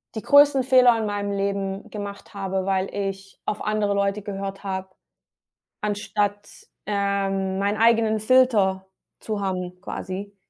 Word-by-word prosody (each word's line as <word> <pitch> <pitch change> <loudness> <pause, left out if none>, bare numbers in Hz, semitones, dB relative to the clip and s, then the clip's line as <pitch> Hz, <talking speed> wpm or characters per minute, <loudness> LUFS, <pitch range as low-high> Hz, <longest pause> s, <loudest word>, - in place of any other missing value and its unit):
die 220 - -3
größten 285 +2 +6
Fehler 250 -2 +5
in 220 - -1
meinem 205 -1 -2
Leben 195 0 -2
gemacht 205 -1 -8
habe, 190 -1 -2
weil 190 0 -1
ich 195 -1 -5
auf 210 - -3
andere 215 -1 0
Leute 200 +1 0
gehört 195 -1 -5
habe. 190 -1 -3 0.9
Anstatt, 205 0 -2 0.4
ähm, 195 -1 -1
meinen 200 +1 +1
eigenen 225 -1 +4
Filter 215 -5 +3 0.3
zu 215 -2 -3
haben, 180 -2 -3
quasi. 200 +1 -6
200 Hz, 130 wpm, -24 LUFS, 195-215 Hz, 0.9 s, größten